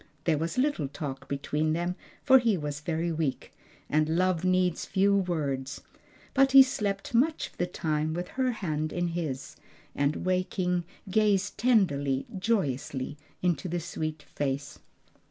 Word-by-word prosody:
There 155 -3 +2
was 165 +5 -3
little 255 - +1
talk 140 -1 -6
between 150 +3 -1
them, 175 +2 -1 0.3
for 265 -1 +7
he 230 -5 +2
was 145 -2 -4
very 165 +2 -1
weak, 155 -4 -2 0.3
and 155 +2 +1
love 185 -2 +2
needs 185 -2 +2
few 200 +1 +2
words; 150 -8 -1 0.5
but 270 0 +4
he 270 0 +11
slept 205 -6 -3
much 300 +7 +2
of - - -28
the 180 - +1
time 155 -2 -1
with 175 +1 -4
her 260 -1 0
hand 155 -8 -2
in 175 0 -1
his, 155 -3 -4 0.4
and 145 +4 0
waking 185 -1 0 0.3
gazed 200 -2 +2
tenderly, 145 - +2
joyously 145 - -1 0.3
into 175 -3 +1
the 175 +1 -1
sweet 155 -2 -4
face. 140 +1 -3
170 Hz, 145 wpm, -28 LUFS, 150-195 Hz, 0.5 s, he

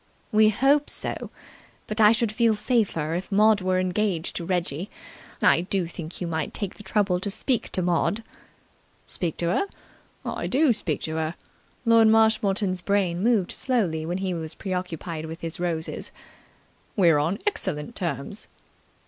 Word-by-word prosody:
"We 215 0 +5
hope 275 +7 +3
so. - - -2 0.6
But 215 +1 -2
I 210 0 +8
should 230 -1 +1
feel 225 0 +3
safer 205 - 0
if 180 +4 -4
Maud 210 0 +4
were 185 0 +1
engaged 185 -2 -1
to 170 - -4
Reggie. 175 0 -2 0.5
I - - +5
do 185 0 -1
think 165 0 -7
you 180 - -3
might 160 -2 -3
take 200 -3 -1
the - - -13
trouble 195 -2 +1
to 200 - -2
speak 220 +4 -1
to 185 - +1
Maud." 180 +5 +1 0.8
"Speak 170 -5 -1
to 170 - 0
her? 395 - +1 0.6
I - - -3
do 275 -1 +3
speak 160 -8 -2
to 160 0 -2
her." 160 +1 -2 0.5
Lord 230 -1 +6
Marshmoreton's 215 -4 +3
brain 185 -3 0
moved 215 -4 +2
slowly 195 -12 0
when 175 +3 -2
he 190 -1 -2
was 160 -2 -4
pre 190 - -4
occupied 170 -3 -4
with 160 +1 -8
his 165 0 -5
roses. 165 -2 -2 0.8
"We're 170 -7 +5
on 165 +7 0
excellent 190 - -1
terms." 170 +2 -4
185 Hz, 160 wpm, -25 LUFS, 170-215 Hz, 0.8 s, I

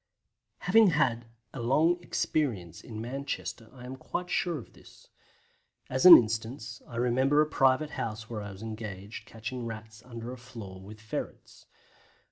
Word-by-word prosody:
Having 220 +4 +6
had 130 -9 +1 0.3
a 125 - -5
long 160 +9 +3
experience 110 - -1
in 110 -2 -8
Manchester 125 -1 -5
I 125 -1 -12
am 130 +1 -6
quite 180 +6 -5
sure 175 -3 0
of 125 - -11
this. - - -18 0.8
As 130 +6 +5
an 180 - +14
instance, 115 +2 -3
I 120 - -10
remember 130 +4 +2
a 155 - +6
private 145 0 +2
house 110 -4 -4
where 110 -2 -5
I 100 -1 -6
was 95 +3 -10
engaged 105 -2 -7
catching 115 +2 -5
Rats 110 -1 -8
under 115 -1 -7
a 130 - -8
floor 105 -6 -10
with 105 +3 -11
ferrets. 110 -1 -7
120 Hz, 155 wpm, -29 LUFS, 110-135 Hz, 0.8 s, an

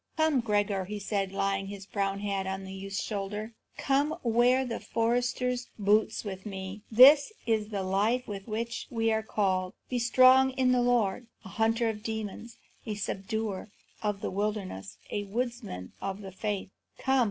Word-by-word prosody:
"Come, 315 -4 +3
Gregor," 205 -4 0
he 210 +3 -5
said, 200 -1 -2
laying 195 0 -1
his 200 -1 -8
brown 195 0 -2
hand 195 -2 -2
on 190 0 -3
the 190 0 -8
youth's 195 0 -4
shoulder, 210 +2 -4 0.2
"come, 285 +3 +1
wear 245 +3 +3
the 235 -2 -3
forester's 245 +2 0
boots 210 +1 +2
with 190 -2 -5
me. 195 0 -6
This 275 - +8
is 220 -2 +1
the 205 -3 -3
life 210 +7 +1
to 205 -2 -5
which 230 +2 -3
we 225 -1 +1
are 220 0 +1
called. 190 -4 0 0.2
Be 250 - +1
strong 255 +2 +6
in 255 -1 +2
the 250 -1 +3
Lord, 240 -2 +1 0.2
a - - -8
hunter 225 +2 +1
of 220 -1 -1
the 210 - -17
demons, 220 +1 -5 0.3
a 215 - -4
subduer 205 +1 -3 0.3
of 210 -2 -1
the - - -2
wilderness, 190 - -3
a 205 0 -2
woodsman 230 - -4
of 195 +1 -4
the 195 -1 -8
faith. 200 0 -3 0.3
Come!" 265 0 +2
210 Hz, 170 wpm, -29 LUFS, 195-240 Hz, 0.3 s, This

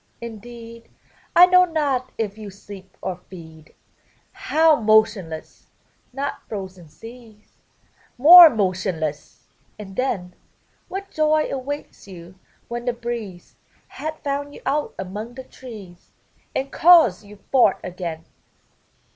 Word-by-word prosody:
indeed 230 0 -11 0.5
I 355 - +9
know 365 0 +5
not 290 -7 -1
if 210 -3 -3
you 215 -2 -9
sleep 195 -1 -13
or 185 -2 -4
feed. 160 -4 -14 0.6
How 325 -5 +2
m.otionless! 215 -7 0 0.2
— - - -41 0.2
not 275 +3 -5
frozen 190 -5 -8
seas 225 +1 -15 0.6
More 335 +6 +10
motionless! 185 - -3 0.3
and 195 -2 -10
then 190 -8 -2 0.5
What 390 +1 -7
joy 310 0 +1
awaits 275 -3 -6
you, 175 -2 -12 0.3
when 240 0 -6
the 245 - 0
breeze 235 -7 -7 0.3
Hath 310 0 -7
found 285 0 -4
you - - -14
out 295 +1 -2
among 210 +5 -7
the 260 - -8
trees, 215 -9 -13 0.5
And 270 +1 -3
calls 315 - +5
you 205 0 -14 0.2
forth 250 -7 +4
again! 170 -3 -6
230 Hz, 120 wpm, -22 LUFS, 190-280 Hz, 0.6 s, More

